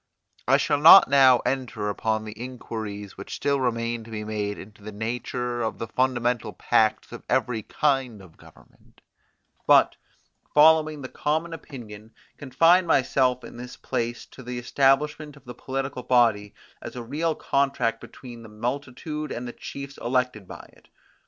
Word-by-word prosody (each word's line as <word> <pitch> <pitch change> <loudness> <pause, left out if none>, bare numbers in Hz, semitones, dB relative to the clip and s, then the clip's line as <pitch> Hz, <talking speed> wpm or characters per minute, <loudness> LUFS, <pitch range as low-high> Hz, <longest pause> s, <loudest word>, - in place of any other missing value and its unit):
I 135 +2 +5
shall 145 0 0
not 165 +3 +9
now 130 -3 +6
enter 125 -6 -2
upon 110 +1 -2
the 110 - -7
inquiries 110 -4 -7
which 100 - -7
still 140 -1 0
remain 115 -2 -2
to - - -13
be 110 -1 -5
made 105 -1 -3
into 105 +2 -13
the 110 +1 -8
nature 120 +3 -4
of 110 - -2
the - - -4
fundamental 125 -1 -1
pacts 110 -1 +1
of - - -8
every 115 -3 0
kind 135 -3 -1
of 90 -4 -16
government, - - -21 0.7
but, - - +5 0.6
following 155 -1 +5
the - - -5
common 160 +5 -2
opinion, 110 -8 -11 0.2
confine 165 +7 +3
myself 130 -3 +2
in - - -11
this 125 +1 -9
place 120 0 -3
to - - -14
the 125 0 -6
establishment 140 +4 +1
of 140 - -19
the 125 - -8
political 135 +1 -4
body 115 -5 +2 0.3
as - - -8
a 120 - -6
real 155 +6 -2
contract 135 -5 0
between 120 -3 -11
the 110 - -12
multitude 135 +6 -5
and 120 +1 -5
the 120 - -7
chiefs 140 0 -9
elected 125 -5 -1
by - - -11
it. - - -24
125 Hz, 160 wpm, -25 LUFS, 115-140 Hz, 0.7 s, not